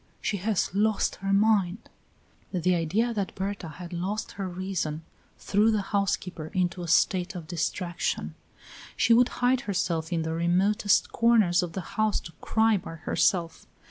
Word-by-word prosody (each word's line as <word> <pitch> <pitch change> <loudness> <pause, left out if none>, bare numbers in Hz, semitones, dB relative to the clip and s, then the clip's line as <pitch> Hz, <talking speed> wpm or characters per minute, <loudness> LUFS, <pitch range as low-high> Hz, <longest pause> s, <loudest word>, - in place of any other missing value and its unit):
She 205 - -1
has 200 -1 -1
lost 210 +1 +1
her 195 +1 -3
mind!" 200 -1 +2 0.6
The 180 -1 +1
idea 190 +8 0
that 200 -3 -3
Berta 195 -2 -4
had 170 +3 -9
lost 190 +5 -3
her 195 -2 -5
reason 175 -4 -3 0.3
threw 210 +2 +2
the 215 -2 +1
housekeeper 185 -5 -1
into 180 -1 0
a 175 - -5
state 180 +3 +2
of 175 -3 -6
distraction. 175 +1 -2 0.6
She 230 - +4
would 245 +1 +5 0.2
hide 255 0 +3
herself 165 -4 -1
in 165 -2 0
the 160 0 -2
remotest 185 +5 +2
corners 220 -7 +4
of 175 -2 -4
the 190 - -3 0.2
house 215 -2 +2
to 165 - -10
cry 220 -1 +2
by 165 -3 -8
herself. 165 +1 0
185 Hz, 155 wpm, -27 LUFS, 170-210 Hz, 0.6 s, would